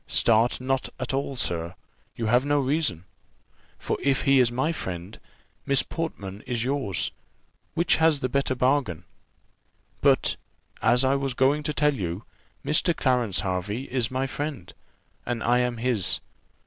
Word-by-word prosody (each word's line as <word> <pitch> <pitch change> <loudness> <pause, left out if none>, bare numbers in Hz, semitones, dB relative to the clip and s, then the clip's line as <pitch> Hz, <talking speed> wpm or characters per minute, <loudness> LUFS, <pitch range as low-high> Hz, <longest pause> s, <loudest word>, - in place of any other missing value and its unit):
Start 115 +1 +3
not 135 +1 -1
at - - -3
all, 135 0 -2
sir, 85 -6 -2 0.4
you 115 - -3
have 120 +3 +3
no 145 0 +2
reason; 135 - 0 0.7
for - - -3
if 135 -1 +1
he 135 -2 +5
is 120 -2 +4
my 130 +6 0
friend, 95 - -6 0.4
Miss 140 -1 +4
Portman 105 - -5
is 120 -2 -1
yours: 130 -8 -1 0.6
which 170 +1 +3
has 160 -2 +4
the 130 - +1
better 135 0 0
bargain? 125 - +1 1.0
But, - - +3 0.4
as 125 +2 +4
I 130 +1 +3
was 135 -2 -1
going 135 +4 +3
to 150 - -2
tell 150 +1 +3
you, 95 -4 -4 0.4
Mr. 155 +4 +2
Clarence 120 -9 +1
Hervey 100 +5 -2
is 125 -3 0
my 130 +1 -1
friend, 135 - -5 0.5
and 120 -2 -3
I 120 +1 +3
am 125 -1 0
his. 115 -5 +1
125 Hz, 150 wpm, -26 LUFS, 110-140 Hz, 1.0 s, he